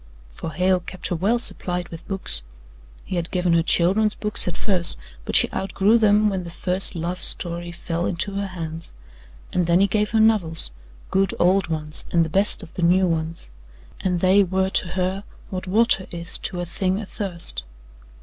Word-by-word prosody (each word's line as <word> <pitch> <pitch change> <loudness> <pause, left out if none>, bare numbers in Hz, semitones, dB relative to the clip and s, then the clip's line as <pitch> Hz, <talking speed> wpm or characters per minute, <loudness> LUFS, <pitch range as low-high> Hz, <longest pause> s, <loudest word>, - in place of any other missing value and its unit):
For 105 - -7
Hale 185 +3 +2
kept 180 +1 -6
her 175 - -1
well 200 +8 +1
supplied 180 -6 0
with 165 0 -11
books. 195 - +2 0.6
He 185 - -4
had 170 -1 -2
given 180 -2 +1
her 165 - +4
children's 195 +6 +2
books 210 -3 0
at 180 - -3
first, 185 -5 +2 0.3
but - - -3
she - - +7
outgrew 195 +4 +2
them 210 -1 +4
when 190 -3 -1
the 170 - -8
first 180 +3 -1
love 175 +2 -4
story 175 0 0
fell 170 0 -3
into 185 +3 -2
her 200 0 -2
hands, 165 -3 -7 0.6
and 180 -2 +1
then 170 +1 +4
he 195 - +5
gave 210 +1 0
her 225 - +1
novels 195 - +2 0.4
good, 195 0 +1
old 185 +1 +3
ones 155 -1 -3
and 170 -1 +2
the - - -5
best 195 +5 +4
of - - -12
the - - -5
new 180 +2 +4
ones, 165 - -3 0.5
and 180 -2 -1
they 190 +2 +5
were 190 +1 -1
to 185 - +1
her 185 +2 -2 0.3
what 185 0 -5
water 210 -1 +2
is 170 +2 -5
to 180 - -2
a 175 - -2
thing 185 +2 -1
athirst. 180 - -3
180 Hz, 190 wpm, -22 LUFS, 170-195 Hz, 0.6 s, she